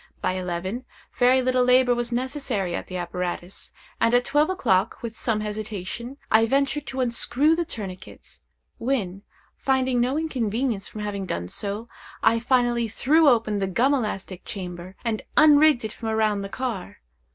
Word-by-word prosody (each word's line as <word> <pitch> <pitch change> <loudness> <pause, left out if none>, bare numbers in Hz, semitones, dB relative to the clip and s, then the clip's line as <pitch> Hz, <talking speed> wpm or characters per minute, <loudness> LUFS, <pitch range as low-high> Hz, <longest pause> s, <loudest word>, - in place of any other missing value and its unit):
By - - 0
eleven, 185 +5 -3 0.4
very 255 +1 +5
little 255 0 +2
labor 250 0 +5
was 240 0 -2
necessary 245 - -2
at - - -4
the 185 - -5
apparatus; 175 +1 -5 0.3
and 230 +1 +3
at 245 0 +3
twelve 295 +3 +2
o'clock, 230 - +1
with 230 -1 -5
some 220 -1 -1
hesitation, 215 +3 -5
I 225 +1 +5
ventured 275 +3 0
to 265 0 -3
unscrew 255 +5 +2
the 340 0 -1
tourniquet, 195 - -8 0.4
when, 205 -7 -1 0.4
finding 260 -2 +1
no 255 +4 +1
inconvenience 240 -7 -1
from 215 - -8
having 200 -2 -4
done 90 - -3
so, 205 - -4 0.4
I 230 - +4
finally 240 -1 +2
threw 295 +8 +4
open 220 -4 +2
the 195 - 0
gum 245 +9 +2
elastic 195 -7 -3
chamber, 185 -3 -7
and 220 -2 -1 0.2
unrigged 300 -4 +6
it 215 - -5
from 225 -1 -5
around 215 -2 +1
the 195 - -5
car. 230 -6 -4
230 Hz, 160 wpm, -24 LUFS, 200-260 Hz, 0.4 s, unrigged